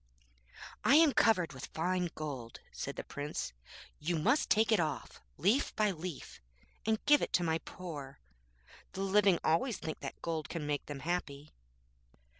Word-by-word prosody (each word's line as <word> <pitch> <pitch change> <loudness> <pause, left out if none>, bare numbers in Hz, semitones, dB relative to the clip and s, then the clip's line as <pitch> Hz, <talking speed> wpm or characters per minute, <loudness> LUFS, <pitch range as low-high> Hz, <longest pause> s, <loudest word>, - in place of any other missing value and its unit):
'I 275 - +6
am 315 -2 +7
covered 180 -8 +3
with 130 0 -7
fine 180 +2 0
gold,' 135 -7 -6
said - - -5
the - - -5
Prince, 145 - -4 0.5
'you 165 +3 -1
must 245 - +2
take 220 +1 +4
it 220 - +5
off, 150 -6 -3 0.2
leaf 210 - +2
by 210 -1 +3
leaf, 170 -3 -7 0.5
and 220 -1 +1
give 295 0 +6
it - - -1
to 175 - +3
my 160 -1 +1
poor; 150 -5 -8 0.8
the 190 - -4
living 195 -1 +4
always 180 +7 +2
think 155 - -5
that - - -7
gold 160 -2 -2
can 165 -3 -4
make 145 -1 -2
them 145 -2 -6
happy.' 150 -3 -3
170 Hz, 160 wpm, -33 LUFS, 150-205 Hz, 0.8 s, am